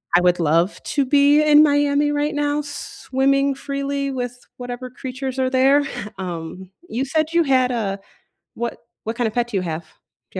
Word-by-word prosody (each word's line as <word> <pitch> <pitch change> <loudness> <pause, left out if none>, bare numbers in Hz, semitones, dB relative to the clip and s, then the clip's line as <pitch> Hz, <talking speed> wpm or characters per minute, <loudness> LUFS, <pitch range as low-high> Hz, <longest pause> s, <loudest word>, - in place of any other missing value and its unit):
I 175 - +6
would 180 0 +3
love 165 +4 +2
to 280 - 0
be 285 +2 +5
in 300 0 +7
Miami 290 0 +2
right 295 +1 -1
now, 290 0 0
swimming 275 -1 -1
freely 275 0 -3
with 245 -1 -4 0.2
whatever 245 0 -6
creatures 260 0 -5
are 260 0 +2
there. 270 +2 +4 0.4
Um, 180 +1 -6 0.2
you 260 +4 -1
said 315 +3 0
you 340 - +4
had 255 -3 +2
a 200 -4 -2 0.6
what 235 0 -4 0.2
what 225 +1 -3
kinda 235 -3 +1
pet 240 +1 -1
do 205 - -1
you - - 0
have, 165 0 -4 0.5
do - - -5
265 Hz, 175 wpm, -21 LUFS, 235-285 Hz, 0.6 s, in